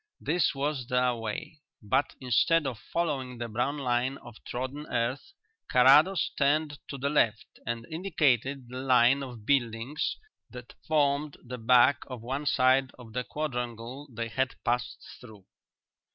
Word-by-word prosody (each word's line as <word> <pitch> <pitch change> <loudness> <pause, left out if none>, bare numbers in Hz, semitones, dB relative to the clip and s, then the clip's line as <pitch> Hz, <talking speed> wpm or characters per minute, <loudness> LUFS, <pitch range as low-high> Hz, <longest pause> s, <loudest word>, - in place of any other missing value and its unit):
This 165 0 +1
was 140 -2 -2
their 125 -1 +2
way, 115 +6 -6 0.2
but 130 +7 0
instead 145 +5 +2
of 125 -5 -3
following 135 -7 -1
the 120 0 -4
brown 125 +6 -1
line 130 0 0
of 120 -4 -13
trodden 130 +4 -5
earth 125 - -2 0.4
Carrados 145 +9 +5
turned 145 0 +1
to 140 - -6
the 140 +2 -2
left 110 -8 +2 0.2
and 120 -1 -3
indicated 140 - 0
the 125 +1 -6
line 130 +1 +4
of 120 -5 -8
buildings 125 +2 0 0.3
that 125 -1 -11
formed 145 -1 +1
the 125 0 -7
back 125 +4 +5
of 125 -4 -8
one 135 +4 -3
side 130 0 +3
of 115 -3 -13
the 125 - -1
quadrangle 125 -1 -5
they 115 0 -4
had 130 +2 -1
passed 120 +1 -1
through. 110 -6 -14
130 Hz, 145 wpm, -28 LUFS, 120-145 Hz, 0.4 s, Carrados